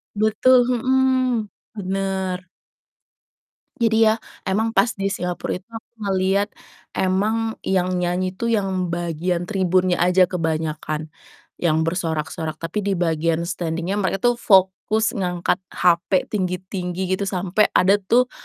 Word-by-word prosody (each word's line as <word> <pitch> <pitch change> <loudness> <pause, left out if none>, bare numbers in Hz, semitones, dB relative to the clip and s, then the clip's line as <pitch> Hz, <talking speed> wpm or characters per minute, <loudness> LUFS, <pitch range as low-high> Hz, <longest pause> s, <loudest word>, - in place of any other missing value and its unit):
Betul, 220 +4 +4
mhm, 255 -2 +1 0.3
bener. 190 -2 -2 1.3
Jadi 225 -1 +4
ya, 215 - +4 0.3
emang 220 +4 +1
pas 240 - +3
di 195 0 -1
Singapora 180 -1 -3
itu 185 +3 -5
aku 225 -1 -10 0.2
ngelihat, 195 +2 +1 0.5
emang 215 +4 0
yang 185 -1 0
nyanyi 180 +1 -1
tuh 230 +5 -4
yang 190 -5 0
bagian 170 +1 -2
tribunnya 185 -2 +1
aja 180 +1 +4
kebanyakan, 155 -2 -2 0.5
yang 160 -2 +2
bersorak-sorak, 160 -2 -2
tapi 165 +6 -4
di 200 -1 0
bagian 165 -1 0
standing-nya 170 +2 -2
mereka 190 0 0
tuh - - -3
fokus 195 +3 +3
ngangkat 180 -3 -1 0.2
HP 175 +2 +2
tinggi-tinggi 185 -2 -3 0.2
gitu 200 - -2
sampai 190 +2 +1
ada 195 +3 +5
tuh, 245 +6 +2
185 Hz, 120 wpm, -22 LUFS, 175-210 Hz, 1.3 s, ada